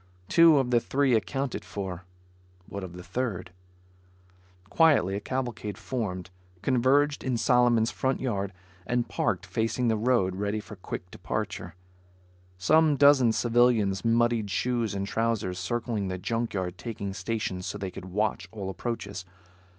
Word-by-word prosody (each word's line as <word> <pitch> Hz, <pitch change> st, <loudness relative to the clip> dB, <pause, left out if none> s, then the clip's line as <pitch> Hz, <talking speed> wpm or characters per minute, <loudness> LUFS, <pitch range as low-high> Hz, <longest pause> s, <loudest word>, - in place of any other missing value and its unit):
Two 165 Hz, -2 st, +6 dB
of 130 Hz, -2 st, +1 dB
the 120 Hz, -, +5 dB
three 135 Hz, +2 st, +1 dB
accounted 135 Hz, +4 st, -1 dB
for. 95 Hz, -3 st, -6 dB, 0.6 s
What 100 Hz, -1 st, -6 dB
of 90 Hz, -2 st, -7 dB
the 90 Hz, 0 st, -9 dB
third? 100 Hz, -6 st, -3 dB, 1.2 s
Quietly 145 Hz, -, +4 dB
a -, -, -1 dB
cavalcade 115 Hz, -3 st, -4 dB
formed, 95 Hz, -8 st, -4 dB, 0.3 s
converged 140 Hz, +3 st, +2 dB
in 130 Hz, -2 st, 0 dB
Solomon's 120 Hz, -1 st, +3 dB
front 130 Hz, 0 st, -1 dB
yard 100 Hz, -6 st, -2 dB, 0.4 s
and 120 Hz, -1 st, 0 dB
parked 100 Hz, -2 st, -1 dB
facing 115 Hz, +5 st, 0 dB
the 110 Hz, -, +2 dB
road 110 Hz, -5 st, +1 dB
ready 105 Hz, +2 st, -1 dB
for 105 Hz, 0 st, -10 dB
quick 90 Hz, -1 st, -7 dB
departure. 90 Hz, -3 st, -4 dB, 0.8 s
Some 155 Hz, -, +4 dB
dozen 140 Hz, -4 st, +6 dB
civilians 115 Hz, -5 st, +2 dB
muddied 115 Hz, -2 st, +2 dB
shoes 115 Hz, 0 st, 0 dB
and 100 Hz, 0 st, -2 dB
trousers 105 Hz, -4 st, -1 dB
circling 110 Hz, 0 st, -2 dB
the 95 Hz, 0 st, -3 dB
junk 115 Hz, +4 st, -2 dB
yard, 90 Hz, -1 st, -3 dB
taking 100 Hz, -4 st, -5 dB
stations 95 Hz, -1 st, -3 dB
so -, -, -4 dB
they 95 Hz, -2 st, -4 dB
could 90 Hz, -, -9 dB
watch 95 Hz, -1 st, -1 dB
all 100 Hz, -3 st, -5 dB
approaches. 100 Hz, -3 st, -4 dB
110 Hz, 145 wpm, -27 LUFS, 95-125 Hz, 1.2 s, Two